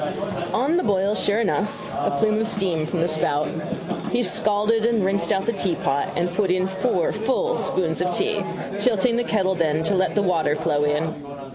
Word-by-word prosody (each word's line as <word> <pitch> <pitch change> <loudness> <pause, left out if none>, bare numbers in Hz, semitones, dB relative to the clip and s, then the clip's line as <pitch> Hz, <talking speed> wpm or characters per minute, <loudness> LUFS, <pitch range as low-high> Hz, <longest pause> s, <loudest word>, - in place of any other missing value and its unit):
On 285 +8 +1
the 360 - +1
boil 200 0 +1
sure 210 +1 +2
enough: 210 -1 -1
a - - 0
plume 215 +9 +1
of 225 - 0
steam 180 -8 0
from 170 0 -2
the 170 - +2
spout. 155 -2 0 0.6
He 245 - +1
scalded 215 +1 +1
and 230 -4 +2
rinsed 195 +1 0
out 195 0 +1
the 235 - 0
teapot 145 -8 -1
and 175 0 -1
put 195 0 +1
in 185 +1 +2
four 190 0 0
full 265 - 0
spoons 170 -3 -1
of 180 0 +1
tea, 440 - 0 0.4
tilting 235 -1 +2
the 240 - +1
kettle 195 -5 +1
then 160 -3 0
to 165 - 0
let 185 -1 +1
the 205 - +2
water 165 -5 +1
flow 150 -2 0
in. 150 +2 0
190 Hz, 190 wpm, -23 LUFS, 165-220 Hz, 0.6 s, sure